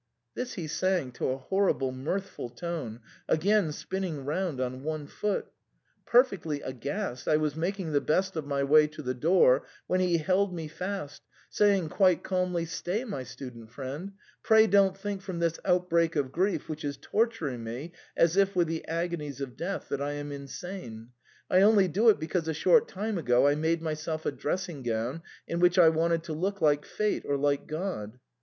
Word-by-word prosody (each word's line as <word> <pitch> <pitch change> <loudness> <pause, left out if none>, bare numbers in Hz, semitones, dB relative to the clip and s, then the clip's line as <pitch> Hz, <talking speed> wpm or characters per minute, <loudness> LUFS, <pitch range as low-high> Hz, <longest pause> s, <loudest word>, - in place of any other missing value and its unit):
This 250 0 -4
he 180 -7 -5
sang 175 -3 0
to - - -3
a 130 - -1
horrible 140 -3 +1
mirthful 150 +3 -4
tune, 125 -3 -5 0.3
again 195 0 +3
spinning 170 -3 -4
round 155 -1 -2
on 130 0 -3
one 155 0 -3
foot. 205 +7 -3 0.6
Perfectly 195 - +3
aghast, 130 - -4
I 155 - +4
was 155 -2 -1
making 175 +1 -2
the 145 -1 +2
best 190 +4 +1
of 155 -3 -3
my 140 -1 0
way 150 +2 +6
to 155 0 -10
the 125 -1 -1
door, 140 -1 +4 0.2
when 185 - +1
he 180 -2 +3
held 185 +4 +1
me 160 -2 -4
fast, 180 -1 -5 0.3
saying 200 -6 +3
quite 185 -1 +3
calmly, 180 -2 0
"Stay, 175 +7 -3
my 205 - -4
student 125 -3 -9
friend, 140 - -6 0.3
pray 220 0 +6
don't 195 -2 +4
think 200 -1 -4
from 190 -2 -5
this 170 -1 0
outbreak 170 -2 +2
of 140 -3 0
grief, 190 +5 0
which 155 0 -5
is 140 -1 -3
tor 225 +10 +2
turing 155 - -5
me 120 +8 -6 0.3
as 165 +1 +4
if 195 0 +3
with 175 -2 +3
the 160 0 -3
agonies 165 -4 -3
of 135 -3 -5
death, 195 +3 -4
that 140 - -2
I 145 +1 -1
am 145 0 -5
insane; 140 - -7 0.4
I 185 - +4
only 205 -2 +6
do 210 +7 +4
it 215 - +4
because 160 +1 -2
a 160 - -1
short 465 - +4
time 210 0 -3
ago 125 -3 +3
I 145 - +4
made 160 +2 0
myself 155 0 -3
a - - +1
dressing 170 +1 -3
gown 120 +5 -2 0.3
in 170 - -2
which 175 0 +4
I 170 -3 +8
wanted 165 +1 +1
to 165 -2 -5
look 195 +6 -2
like 150 -2 +3
Fate 210 -1 -1
or 140 - 0
like 140 0 0
God 150 - -4
165 Hz, 190 wpm, -29 LUFS, 145-190 Hz, 0.6 s, I